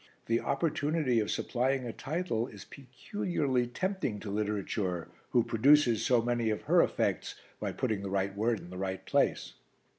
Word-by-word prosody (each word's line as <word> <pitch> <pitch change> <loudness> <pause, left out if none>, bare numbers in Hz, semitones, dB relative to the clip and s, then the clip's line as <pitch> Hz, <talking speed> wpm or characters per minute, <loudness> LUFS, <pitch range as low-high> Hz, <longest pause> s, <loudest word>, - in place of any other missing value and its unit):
The 115 0 +2
opportunity 145 -3 +1
of 105 - -1
supplying 130 +1 0
a 115 - -4
title 145 -7 -2
is 100 -5 -11
peculiarly 135 - -2
tempting 180 - -2
to 105 - -5
literature 100 -4 -2 0.2
who 120 - +3
produces 120 0 +4
so 120 -3 +3
many 120 -1 0
of 105 - -2
her - - +5
effects - - 0 0.2
by - - -2
putting 110 -6 -1
the 100 - -4
right 95 0 -1
word 110 +1 +1
in 90 - -11
the 90 - -7
right 95 0 -3
place." - - +1
120 Hz, 160 wpm, -31 LUFS, 105-135 Hz, 0.2 s, her